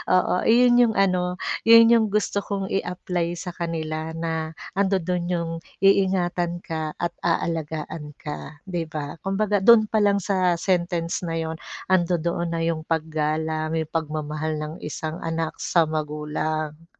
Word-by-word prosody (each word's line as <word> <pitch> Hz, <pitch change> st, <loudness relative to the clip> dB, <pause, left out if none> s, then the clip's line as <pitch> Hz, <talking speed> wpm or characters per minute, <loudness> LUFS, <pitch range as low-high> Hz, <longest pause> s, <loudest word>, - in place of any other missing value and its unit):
oo, 180 Hz, -, +3 dB
iyon 240 Hz, +1 st, +6 dB
yung 230 Hz, -3 st, +4 dB
ano, 180 Hz, -2 st, +2 dB, 0.3 s
yun 230 Hz, 0 st, +9 dB
yung 225 Hz, -2 st, +5 dB
gusto 210 Hz, -1 st, +1 dB
kong 195 Hz, -2 st, -3 dB
i-apply 180 Hz, -2 st, -2 dB
sa 180 Hz, +1 st, -6 dB
kanila 160 Hz, -1 st, -3 dB
na 160 Hz, -1 st, -3 dB, 0.2 s
andodo'n 180 Hz, -3 st, +1 dB
yung 170 Hz, -1 st, -1 dB, 0.3 s
iingatan 180 Hz, -3 st, +2 dB
ka 160 Hz, -1 st, -3 dB
at 175 Hz, 0 st, -2 dB
aalagaan 160 Hz, -2 st, -2 dB
ka, 150 Hz, -1 st, -7 dB
di 170 Hz, -2 st, -2 dB
ba? 150 Hz, 0 st, -5 dB
Kumbaga 205 Hz, +1 st, 0 dB
dun 215 Hz, +1 st, +6 dB
palang 205 Hz, -2 st, +3 dB
sa 185 Hz, -3 st, +2 dB
sentence 175 Hz, -1 st, -1 dB
na 165 Hz, -, -2 dB
yun 160 Hz, 0 st, -3 dB, 0.3 s
andodoon 170 Hz, -1 st, +1 dB
na 165 Hz, -, -1 dB
yung 165 Hz, -1 st, -1 dB
paggalang, 155 Hz, 0 st, -1 dB
yung 160 Hz, -1 st, -2 dB
pagmamahal 155 Hz, -1 st, -2 dB
ng 150 Hz, +1 st, -5 dB
isang 155 Hz, +1 st, -4 dB
anak 165 Hz, -1 st, -2 dB
sa 170 Hz, -2 st, +3 dB
magulang. 155 Hz, +1 st, -3 dB
170 Hz, 140 wpm, -24 LUFS, 155-185 Hz, 0.3 s, yun